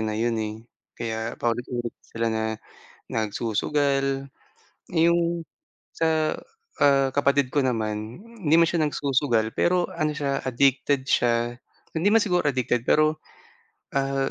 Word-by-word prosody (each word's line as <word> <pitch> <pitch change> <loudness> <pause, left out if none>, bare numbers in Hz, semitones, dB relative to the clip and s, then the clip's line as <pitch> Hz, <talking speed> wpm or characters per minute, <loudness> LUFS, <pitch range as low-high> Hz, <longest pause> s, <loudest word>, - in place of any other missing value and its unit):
na 110 -1 -2
yun, 115 +1 0
eh, 105 0 -3 0.4
kaya 115 0 -4
paulit-ulit 120 0 -2
sila 115 0 -3
na 110 0 -1 0.7
nagsusugal. 135 +6 0 0.6
Yung 170 0 +2 0.5
sa, 160 -1 +1 0.5
ah, 135 -2 +4
kapatid 140 -2 +2
ko 145 - +3
naman 110 - -2 0.2
hindi 150 - +4
man 170 0 +5
siya 170 - 0
nagsusugal 135 -6 +1
pero 180 0 +2
ano 155 -2 -1
siya 140 -2 -1
addicted 130 +1 +2
siya, 120 -2 +1 0.3
hindi 165 +5 +1
man 220 +1 +5
siguro 180 -6 +1
addicted 125 -3 -1
pero, 155 0 +3 0.8
ah, 135 0 0
135 Hz, 120 wpm, -25 LUFS, 115-150 Hz, 0.8 s, man